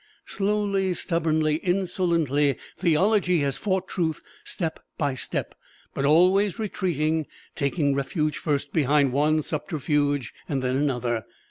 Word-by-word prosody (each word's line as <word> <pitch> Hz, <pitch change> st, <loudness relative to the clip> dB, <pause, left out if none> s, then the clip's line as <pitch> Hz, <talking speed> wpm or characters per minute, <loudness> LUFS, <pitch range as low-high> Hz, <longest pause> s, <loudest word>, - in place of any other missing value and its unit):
Slowly, 200 Hz, -2 st, 0 dB
stubbornly, 155 Hz, -3 st, +1 dB
insolently, 170 Hz, -6 st, +1 dB, 0.2 s
theology 180 Hz, +1 st, +2 dB
has 140 Hz, -1 st, -1 dB
fought 190 Hz, -2 st, -1 dB
Truth 160 Hz, -4 st, -2 dB, 0.2 s
step 165 Hz, -3 st, -3 dB, 0.2 s
by 145 Hz, -3 st, 0 dB
step 130 Hz, -, -3 dB, 0.4 s
but 140 Hz, -, -1 dB
always 185 Hz, +7 st, +4 dB
retreating, 160 Hz, -, -1 dB, 0.3 s
taking 140 Hz, 0 st, 0 dB
refuge 150 Hz, +3 st, -1 dB
first 145 Hz, -2 st, -2 dB
behind 145 Hz, -2 st, +3 dB
one 150 Hz, +3 st, +2 dB
subterfuge, 145 Hz, -, -1 dB, 0.2 s
then 135 Hz, -4 st, -1 dB
another. 125 Hz, -3 st, 0 dB
155 Hz, 110 wpm, -25 LUFS, 140-180 Hz, 0.4 s, always